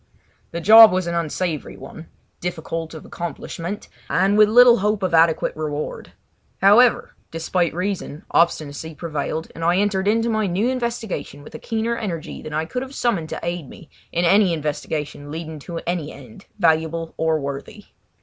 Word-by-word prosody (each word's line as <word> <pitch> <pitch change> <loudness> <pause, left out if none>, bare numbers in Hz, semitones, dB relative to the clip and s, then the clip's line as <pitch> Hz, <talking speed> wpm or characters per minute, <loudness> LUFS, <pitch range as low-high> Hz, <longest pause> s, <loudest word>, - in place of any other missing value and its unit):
The 170 - -5
job 220 +4 +9
was 185 -1 0
an 170 - -3
unsavoury 170 -1 -3
one, 160 +5 -11 0.3
difficult 165 -2 -5
of 155 - -10
accomplishment, 175 +2 -6 0.2
and 195 +2 +2
with 210 0 +6
little 240 +1 +7
hope 210 0 0
of 185 - -1
adequate 165 0 +3
reward. 150 -1 -5 0.5
However, 215 +5 +5 0.2
despite 165 +1 -1
reason, 180 -5 -4
obstinacy 160 -2 0
prevailed, 155 0 -4
and 165 - -7
I 175 +2 +3
entered 200 -1 0
into 225 +2 +2
my 220 -2 0
new 195 +7 0
investigation 235 - -4
with - - -13
a - - -7
keener 225 +1 -2
energy 180 -8 -5
than 155 - -8
I 155 +1 -1
could 250 +9 -4
have 265 +1 -8
summoned 195 -10 -1
to - - -5
aid 170 -4 -4
me 165 - -14 0.2
in 170 +1 0
any 195 0 +4
investigation 150 -1 -4
leading 160 0 -6
to 170 +4 -7
any 170 -4 -2
end, 210 -3 -14
valuable 165 -2 +1
or 160 -1 +1
worthy. 140 +9 -7
170 Hz, 165 wpm, -21 LUFS, 160-205 Hz, 0.5 s, job